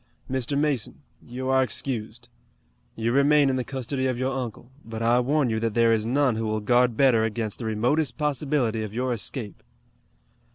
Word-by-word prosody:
Mr. 130 +1 -1
Mason, 145 -7 -1 0.2
you 130 +2 -6
are 130 0 +4
excused. 120 -1 -3 0.7
You 115 +1 -1
remain 140 +1 +4
in - - -1
the 130 - -1
custody 130 +1 -3
of 130 -2 -1
your 130 +2 -1
uncle, 120 -1 -6
but 115 0 -6
I 120 +2 +4
warn 135 0 +1
you 110 - 0
that 115 -1 -2
there 115 -1 +4
is 110 0 0
none 130 -2 +2
who 110 0 -2
will 110 0 -1
guard 120 +2 +2
better 125 -5 +4
against 110 -1 -3
the 120 - -5
remotest 120 +6 0
possibility 140 -6 0
of 110 0 -6
your 125 +1 0
escape." 115 -1 -6
125 Hz, 180 wpm, -25 LUFS, 115-135 Hz, 0.7 s, are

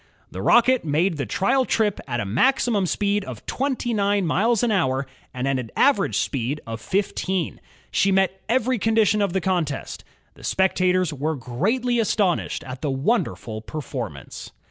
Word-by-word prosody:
The - - -6
Rocket 245 +1 +4
made 165 +3 +1
the 140 - -3
trial 260 +7 +2
trip 215 -5 0
at 120 - -2
a 100 - -2
maximum 210 - +2
speed 205 +2 0
of - - -9
twenty 260 -3 -1
nine 200 -2 +1
miles 220 +7 +2
an 240 - +2
hour 135 -9 +1 0.3
and 125 +1 -3
at 135 -1 +1
an 115 -3 -6
average 265 -8 +3
speed 135 +2 -1
of 115 -1 -6
fifteen. 190 -2 -1 0.3
She 195 - +2
met 190 0 +1
every 255 0 +1
condition 220 -1 +3
of 200 -3 0
the 190 - 0
contest. 170 -6 -2 0.3
The - - -17
spectators 185 -2 +1
were 150 +3 -2
greatly 215 - 0
astonished 200 -5 0
at 130 -1 -8
the 150 - -1
wonderful 135 - -1
per 135 - -8
formance. 115 - -6
190 Hz, 165 wpm, -23 LUFS, 140-220 Hz, 0.3 s, Rocket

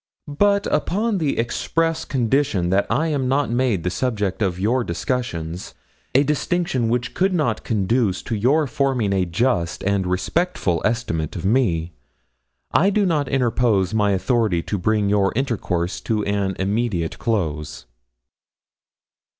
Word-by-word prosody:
But 200 +7 +2
upon 205 +6 0
the 150 -4 0
express 165 +7 -1
condition 120 -8 +1
that 100 +1 +2
I 150 +8 +1
am 140 -4 0
not 135 -1 +1
made 120 -7 +1
the 90 - -1
subject 105 -6 -2
of 90 -3 0
your 120 +6 +1
discussions 85 -3 -3 0.4
a 135 - +6
distinction 150 -4 0
which 120 +1 -1
could 190 +4 +1
not 120 -10 0
conduce 105 -1 0
to - - -4
your 135 +9 +2
forming 130 -6 0
a 95 -1 +1
just 85 -3 0
and 100 -1 0
respectful 90 - 0
estimate 95 -9 -1
of - - -5
me 90 -8 +1 0.8
I 195 - +4
do 205 0 +2
not 150 -6 0
interpose 115 -7 +1
my 105 -2 +2
authority 95 -2 +1
to 100 - -3
bring 105 +2 +1
your 100 -1 +2
intercourse 95 -9 -1
to 110 -2 -1
an 100 -1 -1
immediate 100 -4 -1
close.' 80 - -2
115 Hz, 140 wpm, -22 LUFS, 95-135 Hz, 0.8 s, a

